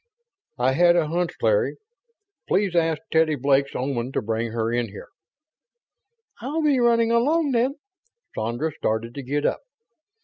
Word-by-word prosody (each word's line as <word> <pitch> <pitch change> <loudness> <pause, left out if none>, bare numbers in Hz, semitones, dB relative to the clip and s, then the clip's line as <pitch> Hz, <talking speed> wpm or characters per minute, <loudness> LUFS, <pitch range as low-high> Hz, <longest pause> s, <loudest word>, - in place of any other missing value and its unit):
"I 125 +1 +2
had 175 +5 +4
a 160 -3 +1
hunch. 175 +2 -1
Larry, - - +2 0.7
please 195 -2 +1
ask 165 -2 +2
Teddy 160 -1 +3
Blake's 140 +1 +1
Oman 130 -1 -2
to - - 0
bring 115 +1 -2
her 115 0 -1
in 120 -1 0
here...." 100 - -11 1.3
"I'll 300 +6 -2
be 290 -4 +3
running 230 -1 +3
along, 285 +6 +2
then." 255 +3 +1 0.6
Sandra 120 +8 -2
started 115 -4 -2
to 140 - -6
get 145 +3 -2
up. - - 0
155 Hz, 145 wpm, -24 LUFS, -, 1.3 s, had